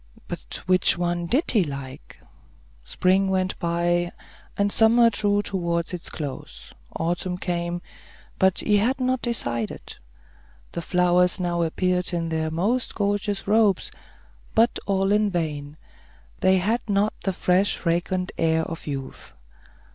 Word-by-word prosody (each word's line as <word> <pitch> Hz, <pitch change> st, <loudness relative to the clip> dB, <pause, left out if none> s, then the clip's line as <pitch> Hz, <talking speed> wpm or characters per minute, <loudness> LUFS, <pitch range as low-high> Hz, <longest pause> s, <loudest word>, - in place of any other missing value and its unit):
But -, -, -6 dB
which 185 Hz, -1 st, +4 dB
one 175 Hz, 0 st, -1 dB
did 270 Hz, -, +2 dB
he 215 Hz, -5 st, +4 dB
like? 140 Hz, -3 st, -8 dB, 0.6 s
Spring 190 Hz, -, +1 dB
went 185 Hz, -1 st, -1 dB
by, 175 Hz, +1 st, 0 dB, 0.5 s
and 200 Hz, 0 st, +1 dB
summer 230 Hz, +2 st, +5 dB
drew 205 Hz, 0 st, +1 dB
towards 170 Hz, -3 st, -2 dB
its 175 Hz, -, -5 dB
close; 145 Hz, -4 st, -7 dB, 0.2 s
autumn 175 Hz, +2 st, -2 dB
came; 175 Hz, -1 st, -3 dB, 0.6 s
but 190 Hz, -1 st, +3 dB
he 210 Hz, -1 st, +3 dB
had 245 Hz, +7 st, +1 dB
not 255 Hz, -1 st, 0 dB
decided. 120 Hz, -, -2 dB, 0.7 s
The 170 Hz, -, -4 dB
flowers 180 Hz, +1 st, +2 dB
now 175 Hz, -1 st, -1 dB
appeared 180 Hz, +2 st, 0 dB
in 165 Hz, -1 st, -1 dB
their 160 Hz, -1 st, -1 dB
most 205 Hz, +10 st, -1 dB
gorgeous 205 Hz, -1 st, -1 dB
robes, 210 Hz, -2 st, +3 dB, 0.6 s
but 230 Hz, +2 st, +3 dB
all 195 Hz, 0 st, +1 dB
in 210 Hz, 0 st, +3 dB
vain; 150 Hz, -4 st, -3 dB, 0.6 s
they 190 Hz, 0 st, +4 dB
had 215 Hz, +6 st, 0 dB
not 205 Hz, +1 st, +2 dB
the 195 Hz, -, 0 dB
fresh, 185 Hz, +2 st, +2 dB
fragrant 180 Hz, +2 st, -1 dB
air 160 Hz, 0 st, +2 dB
of 165 Hz, 0 st, -7 dB
youth. 135 Hz, -, -6 dB
180 Hz, 130 wpm, -24 LUFS, 170-205 Hz, 0.7 s, summer